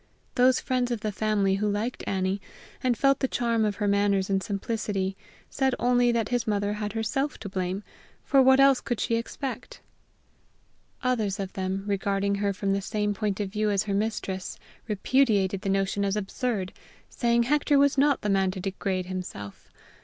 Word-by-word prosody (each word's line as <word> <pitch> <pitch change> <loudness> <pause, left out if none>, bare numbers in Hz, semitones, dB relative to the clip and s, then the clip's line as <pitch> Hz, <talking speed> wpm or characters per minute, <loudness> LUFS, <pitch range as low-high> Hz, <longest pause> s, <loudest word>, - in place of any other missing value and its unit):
Those 255 +1 +4
friends 250 -1 0
of 235 -3 -2
the 215 - -2
family 200 -2 +1
who 210 - +1
liked 215 +5 -2
Annie, 190 +1 -1 0.4
and 250 -2 +1
felt 275 +2 +3
the 265 - +1
charm 235 -3 0
of 210 -1 0
her 210 - -1
manners 200 -1 +2
and 195 0 +2
simplicity, 200 -2 -2 0.3
said 265 -2 0
only 245 0 +3
that 230 -2 0
his 245 -1 0
mother 205 -1 0
had 210 -1 -4
herself 250 +6 -1
to 205 - -7
blame, 190 +1 -3 0.4
for 275 -2 +4
what 265 +1 +6
else 275 -1 +6
could 240 - -3
she 230 - +1
expect? 245 +3 -5 1.2
Others 220 -6 0
of 195 -1 -4
them, 190 0 -2
regarding 200 0 0
her 200 0 0
from 195 0 -1
the 200 - 0
same 210 +1 -1
point 205 -1 -2
of 200 -2 -2
view 210 0 0
as 200 0 +1
her 200 - -3
mistress, 195 -2 -2 0.3
repudiated 205 -3 +2
the 195 - -2
notion 195 +1 0
as 200 0 0
absurd, 210 -1 -2 0.3
saying 235 -1 +1
Hector 290 +2 +2
was 280 0 +4
not 280 0 +3
the - - -2
man 195 -1 +2
to 185 0 -5
degrade 190 -1 -2
himself! 180 - -7
210 Hz, 180 wpm, -27 LUFS, 195-240 Hz, 1.2 s, what